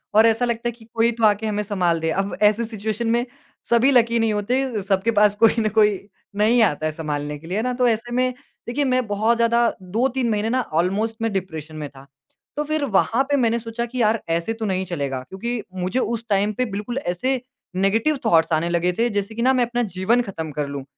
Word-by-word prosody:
और 220 +1 +7
ऐसा 225 +2 +3
लगता 235 0 -2
है - - 0
कि 230 -1 -17
कोई 230 +1 +3
तो 230 - -3
आके 210 +1 +2
हमें 210 0 -1
संभाल 180 -5 0
दे। 160 - -1
अब 195 +1 -2
ऐसी 215 +2 -2
सिचुएशन 220 0 -3
में 240 +1 0 0.4
सभी 235 +4 +4
लकी 235 -2 +3
नहीं 225 -1 +1
होते, 240 +2 -1
सबके 195 +3 +1
पास 210 -1 +4
कोई 225 - +6
न 215 -1 +1
कोई 210 -2 +4 0.4
नहीं 230 +3 +4
आता 155 -6 0
है 155 - 0
संभालने 150 -2 -4
के 160 - -13
लिए। 185 +4 -2
है 220 - 0
ना? 250 0 -1
तो 250 0 +2
ऐसे 230 +1 -1
में 255 0 +1 0.3
देखिए 280 +5 0
मैं 255 -2 +1
बहुत 215 +3 +1
ज़्यादा 235 0 +3 0.2
2-3 240 +6 0
महीने 215 0 0
ना 255 - +2 0.2
ऑलमोस्ट 210 +5 -1
मैं 225 -1 0
डिप्रेशन 160 -5 -5
में 150 -2 -5
था। 135 0 -15 0.5
तो 295 - +1
फिर 310 -1 +1
वहाँ 230 +6 +3
पे 285 - +3
मैंने 235 -2 +2
सोचा 230 +1 -4
कि 245 +1 -4
यार! 220 0 +2
ऐसे 170 +6 0
तो - - 0
नहीं 190 -2 -1
चलेगा। 140 -7 -3
क्योंकि 235 +4 -4 0.2
मुझे 190 +8 0
उस 230 -2 -2
टाइम 205 +1 +2
पे 250 +4 -1
बिल्कुल 215 +5 -4
ऐसे 255 +4 -1 0.3
नेगेटिव 220 +10 +2
थॉट्स 165 -5 +3
आने 160 +2 +1
लगे 175 +1 +1
थे 240 +1 +3
जैसे 205 +2 -6
कि 235 - -3
ना 260 +2 +4
मैं 250 -2 +2
अपना 240 +1 -1
जीवन 230 +6 +3
ख़त्म 165 -8 -5
कर 145 0 -3
लूँ। 140 -1 -5
220 Hz, 230 wpm, -22 LUFS, 185-235 Hz, 0.5 s, और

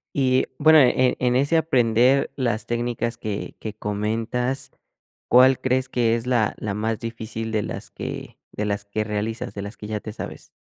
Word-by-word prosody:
Y 130 -2 +3
bueno 155 +1 +7
en 130 -1 +4
en 125 -1 +2
ese 140 +5 +3
aprender 130 -3 +3
las 120 -4 -1
técnicas 120 0 -2
que 105 -3 -5
que 110 - -5
comentas, 115 +6 -2 0.6
¿cuál 130 +1 +6
crees 130 0 +1
que 115 -2 +2
es 115 +1 -2
la 120 -4 +2
la 105 -2 -3
más 110 +1 -2
difícil 115 -1 -5
de 110 -1 +1
las - - -4
que - - -7
de 105 - -3
las 100 -1 -2
que 105 +1 -2
realizas, 110 +3 -3
de 100 - -5
las 100 +3 -7
que 105 - -8
ya 105 0 -3
te 110 - -7
sabes? 115 - -8
115 Hz, 180 wpm, -23 LUFS, 110-130 Hz, 0.6 s, bueno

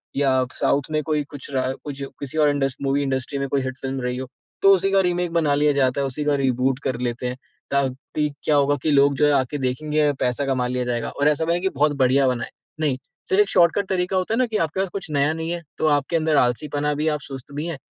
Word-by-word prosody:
या 135 -2 +2
साउथ 140 0 +1
में 155 0 +1
कोई 150 0 0
कुछ 145 -1 -9
रहा 130 0 0
कुछ 140 -1 -7 0.2
किसी 140 +2 -6
और 150 -1 +5
इंडस 135 -2 0
मूवी 140 +1 +1
इंडस्ट्री 135 +1 -2
में 140 - -1
कोई 140 -1 +1
हिट 130 0 -4
फ़िल्म 135 0 -4
रही 125 0 -2
हो। 130 0 -5 0.3
तो 195 - +7
उसी 195 +1 0
का 195 0 +4
रीमेक 175 -1 -1
बना 155 -4 +2
लिया 150 0 +3
जाता 135 0 +1
है, 135 - 0
उसी 140 +3 -4
का 145 -1 +2
रिबूट 130 +1 +1
कर 125 -2 -2
लेते 120 0 -2
हैं 125 +1 -4 0.3
ताकि 140 +2 -1
क्या 150 - +2
होगा 145 0 +3
कि 155 - +2
लोग 140 0 +4
जो 150 - +4
है 145 - +4
आके 135 +2 0
देखेंगे 150 +3 0
पैसा 125 +3 0
कमा 130 -2 0
लिया 125 0 -2
जाएगा। 120 -1 -2
और 145 +1 0
ऐसा 150 +2 +2
नहीं 170 +1 +1
है - - -5
कि 190 - +1
बहुत 145 +2 +2
बढ़िया 135 +1 +4
बना 125 -2 0
है, - - -6 0.3
नहीं। 145 -5 +1 0.3
सिर्फ़ 200 +1 +4
शॉर्टकट 180 +3 +3
तरीका 185 0 0
होता 185 +4 -1
है - - +1
ना 255 - +4
कि 220 -2 -2
आपके 165 +3 -1
पास 190 -1 0
कुछ 190 -5 -5
नया 145 +2 +2
नहीं 160 +1 -4
है 175 -1 -3 0.2
तो 155 - +2
आपके 145 +2 +1
अंदर 155 -1 +1
आलसीपना 145 +4 +1
भी 150 +2 -1
है, 155 - +3
आप 150 - -2
सुस्त 135 -1 -9
भी 150 +3 -3
है 165 -5 -4
145 Hz, 260 wpm, -23 LUFS, 130-155 Hz, 0.3 s, तो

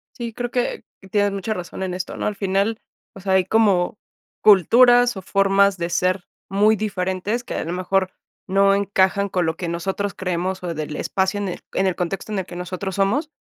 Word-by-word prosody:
Sí, 235 -2 -5
creo 245 +1 -4
que, 245 -1 -1 0.3
tienes 205 -1 +2
mucha 200 +2 -2
razón 180 -1 -6
en 185 -1 -3
esto, 180 0 -5
¿no? - - -3
Al 210 - -2
final, 200 +3 0 0.3
o - - -10
sea, 190 0 -1
hay 190 -1 +4
como, 200 -3 +2 0.4
culturas 245 +5 +6
o - - -5
formas 195 0 +3
de 170 -1 -3
ser 180 +1 0 0.2
muy 210 +3 +4
diferentes 200 +2 -2
que - - -6
a - - -2
lo 170 - -4
mejor, 185 +1 0 0.4
no 195 +1 +4
encajan 200 0 +2
con 180 -2 0
lo 160 0 -1
que 175 - -4
nosotros 190 +4 -2
creemos 185 0 -3
o 175 -2 -3
del 150 -1 -5
espacio 190 +5 -1
en 200 -2 -2
el 175 - -5
en 195 - +1
el 185 -2 +1
contexto 185 +4 -3
en 205 - -1
el 185 - -4
que 175 - -10
nosotros 185 +1 -5
somos. 220 +11 +1
195 Hz, 205 wpm, -22 LUFS, 180-205 Hz, 0.4 s, culturas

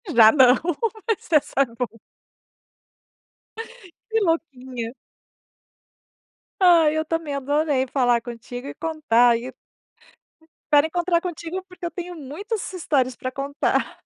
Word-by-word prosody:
Já 220 -1 +8
não, 260 -3 +6 0.5
mas 435 -5 -2
essa 285 -3 +3
é - - +4
boa. 230 -1 -6 2.1
Que 445 0 +1
louquinha. 260 -8 -3 1.7
Ai 335 -4 +5
eu 315 - +1
também 325 -2 -3
adorei 285 -1 0
falar 245 -3 +2
contigo 245 +2 -8
e - - -6
contar 295 -8 +2
aí 235 +2 0 1.2
Espero 295 +1 +5
encontrar 345 0 0
contigo, 355 +1 -5
porque 360 -2 -10
eu 340 - -3
tenho 355 0 -6
muitas 360 - -5
histórias 265 -8 0
para 255 +1 -5
contar. 280 +2 -1
290 Hz, 115 wpm, -23 LUFS, 250-335 Hz, 2.1 s, Já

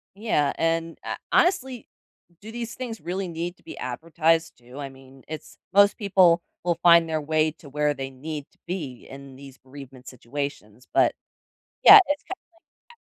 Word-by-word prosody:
Yeah, 195 -10 0
and, 165 0 -1
h - - -4
honestly, 265 - +1 0.5
do 215 +2 -10
these 235 0 -6
things 245 -3 -6
really 185 +2 -4
need 170 +1 -5
to - - -28
be - - -10
advertised 160 +5 -1
to, 125 +3 -13
I 140 -1 -5
mean, 135 0 -17
it's 155 -1 -9 0.2
most 200 0 +5
people 185 -5 +4 0.2
will 175 -1 +1
find 170 -1 +7
their 160 -1 -2
way 155 +1 +1
to 155 -2 -16
where 150 +1 0
they 135 -1 -6
need 145 +2 -7
to - - -32
be 150 -9 -6
in 135 0 -11
these 135 0 -13
bereavement 135 -1 -13
situations, 125 -2 -7
but, - - +4 0.7
yeah, 415 - +11
it's 290 0 -2
kinda 385 - -7 0.4
like - - -89
that 475 - -16
160 Hz, 175 wpm, -24 LUFS, 135-185 Hz, 0.7 s, yeah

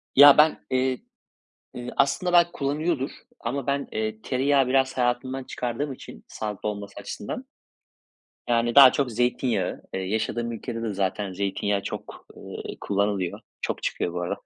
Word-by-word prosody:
Ya, 145 +1 +10
ben, 155 +1 +4
eee, 130 0 +1 0.8
eee, 125 0 -6
aslında 175 +6 +2
belki 175 -1 +5
kullanıyordur 145 0 -1 0.3
ama 125 +3 -3
ben, 140 0 -1
eee, 110 0 -2
tereyağı 135 +1 +2
biraz 130 0 +2
hayatımdan 125 +2 0
çıkardığım 125 +4 -3
için, 95 - -11
sağlıklı 105 -1 -4
olması 100 -1 -6
açısından. 105 - -6 1.0
Yani, 120 0 +2
daha 135 -2 +10
çok 135 -4 0
zeytinyağı, 120 -4 0
eee, 95 - -2
yaşadığım 110 +4 -2
ülkede 115 0 -5
de 110 -2 -2
zaten 95 0 -2
zeytinyağı 100 +1 -1
çok, - - -7
eee, - - -8
kullanılıyor. 100 -3 -1 0.2
Çok - - -3
çıkıyor 85 - -1
bu 90 - -3
ara. 85 - -2
120 Hz, 145 wpm, -25 LUFS, 105-135 Hz, 1.0 s, Ya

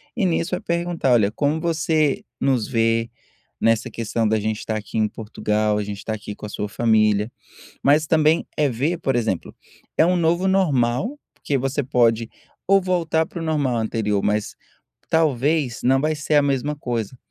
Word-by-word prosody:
E 225 -5 +1
nisso 165 +1 -1
vai 180 - -1
perguntar: 170 -5 0
"Olha, 105 -4 +3
como 145 +6 0
você 155 -3 +1 0.2
nos 130 -6 +1
vê 115 -1 +1 0.5
nessa 115 +2 +2
questão 115 0 -1
da 110 0 +1
gente 110 +1 -2
estar 110 - -3
aqui 110 +1 -6
em 110 - +3
Portugal, 105 -1 -1
a 105 - -1
gente 100 0 -5
estar 110 - -4
aqui 105 -1 -8
com - - -9
a - - -6
sua 105 -1 -4
família", 110 -1 +2 0.5
mas 150 +2 +4
também 155 +1 +3
é 150 -2 +2
ver 145 +9 -1
por 135 -5 -1
exemplo, 110 -7 -2 0.4
é 160 - +6
um 180 - +2
novo 175 +2 +2
normal, 185 - +1 0.2
porque 140 -2 -2
você 135 +2 -1
pode 115 -3 +2 0.4
ou 195 +1 +5
voltar 170 -3 0
para 170 - -8
o 165 - -4
normal 145 -6 0
anterior, 110 -2 -1
mas 105 0 -1 0.5
talvez 150 -4 +1
não 135 +1 +4
vai 155 +2 0
ser 150 0 -2
a 145 - +6
mesma 140 +1 0
coisa, 120 -4 -3
130 Hz, 180 wpm, -22 LUFS, 110-160 Hz, 0.5 s, é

